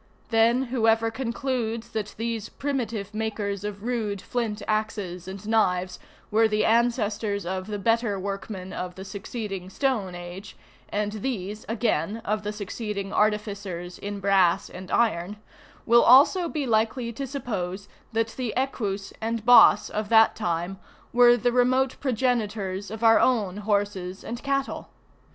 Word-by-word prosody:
Then, 230 Hz, +3 st, +4 dB
whoever 225 Hz, -1 st, +3 dB
concludes 235 Hz, -2 st, -3 dB
that 215 Hz, -2 st, -4 dB
these 225 Hz, -1 st, -3 dB
primitive 230 Hz, -7 st, -3 dB
makers 210 Hz, -2 st, -3 dB
of 205 Hz, -1 st, -5 dB
rude 225 Hz, -4 st, -2 dB
flint 220 Hz, -1 st, -3 dB
axes 205 Hz, -5 st, -2 dB
and 190 Hz, +2 st, -8 dB
knives 185 Hz, -5 st, +1 dB, 0.3 s
were 220 Hz, +1 st, +4 dB
the 215 Hz, 0 st, +1 dB
ancestors 220 Hz, -4 st, +1 dB
of 185 Hz, +1 st, -3 dB
the 210 Hz, -1 st, -3 dB
better 225 Hz, -1 st, +1 dB
workmen 195 Hz, -1 st, -5 dB
of 180 Hz, 0 st, -5 dB
the 190 Hz, -, -8 dB
succeeding 195 Hz, -1 st, -6 dB
stone 215 Hz, -7 st, -1 dB
age, 175 Hz, +4 st, -9 dB, 0.3 s
and 210 Hz, 0 st, -1 dB
these 215 Hz, -2 st, -4 dB
again 225 Hz, -1 st, 0 dB
of 210 Hz, +1 st, 0 dB
the 210 Hz, 0 st, -3 dB
succeeding 205 Hz, -1 st, -5 dB
artificers 200 Hz, -4 st, -1 dB
in 205 Hz, 0 st, -5 dB
brass 195 Hz, -3 st, +3 dB
and 185 Hz, +1 st, -9 dB
iron, 205 Hz, -3 st, +1 dB, 0.5 s
will 235 Hz, +1 st, +6 dB
also 300 Hz, +8 st, +6 dB
he 300 Hz, -3 st, -2 dB
likely 230 Hz, +1 st, 0 dB
to 275 Hz, +4 st, -5 dB
suppose 200 Hz, -8 st, -4 dB, 0.2 s
that 225 Hz, 0 st, 0 dB
the 240 Hz, -1 st, -4 dB
Equus 210 Hz, -7 st, -2 dB
and 225 Hz, 0 st, -2 dB
Bos 245 Hz, -3 st, +7 dB
of 210 Hz, -1 st, -4 dB
that 225 Hz, -1 st, +6 dB
time 175 Hz, -1 st, -2 dB, 0.3 s
were 240 Hz, 0 st, +7 dB
the 245 Hz, +1 st, +1 dB
remote 255 Hz, +2 st, +2 dB
progenitors 215 Hz, -6 st, -1 dB
of 220 Hz, +2 st, -7 dB
our 225 Hz, 0 st, +7 dB
own 210 Hz, -7 st, +2 dB
horses 200 Hz, -3 st, -2 dB
and 235 Hz, +1 st, -6 dB
cattle. 275 Hz, -1 st, -2 dB
215 Hz, 140 wpm, -26 LUFS, 200-235 Hz, 0.5 s, Bos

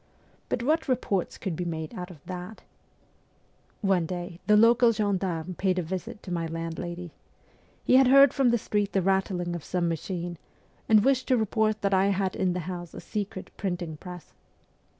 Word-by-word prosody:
But 235 Hz, -, -1 dB
what 315 Hz, +5 st, +1 dB
reports 220 Hz, -8 st, -1 dB
could 185 Hz, -4 st, -3 dB
be 180 Hz, -, -3 dB
made 160 Hz, -2 st, -4 dB
out 180 Hz, 0 st, -6 dB
of 160 Hz, -6 st, -14 dB
that? 180 Hz, +4 st, -7 dB, 1.2 s
One 190 Hz, -5 st, +2 dB
day 175 Hz, 0 st, -5 dB
the 210 Hz, 0 st, +6 dB
local 230 Hz, +2 st, +6 dB
gendarme 190 Hz, -5 st, -1 dB
paid 185 Hz, +1 st, 0 dB
a 180 Hz, -, 0 dB
visit 185 Hz, +4 st, -6 dB
to 185 Hz, -, -7 dB
my 165 Hz, -1 st, -1 dB
landlady. 165 Hz, +1 st, -5 dB, 0.7 s
He 255 Hz, -, +5 dB
had 265 Hz, -1 st, +6 dB
heard 275 Hz, +1 st, +7 dB
from 270 Hz, -3 st, +3 dB
the 240 Hz, -, +3 dB
street 205 Hz, -2 st, -1 dB
the 195 Hz, -, +2 dB
rattling 185 Hz, -2 st, 0 dB
of 170 Hz, -, -6 dB
some 180 Hz, -2 st, -1 dB
machine, 170 Hz, +1 st, -4 dB, 0.5 s
and 215 Hz, -1 st, +6 dB
wished 265 Hz, -1 st, +2 dB
to 255 Hz, -, +3 dB
report 220 Hz, 0 st, +1 dB
that 200 Hz, 0 st, +2 dB
I 190 Hz, +1 st, +4 dB
had 195 Hz, -1 st, 0 dB
in 185 Hz, -2 st, +1 dB
the 180 Hz, -, -2 dB
house 175 Hz, 0 st, -6 dB
a -, -, -6 dB
secret 200 Hz, -3 st, -5 dB
printing 175 Hz, -5 st, -3 dB
press. 180 Hz, +1 st, -10 dB
185 Hz, 180 wpm, -27 LUFS, 175-210 Hz, 1.2 s, heard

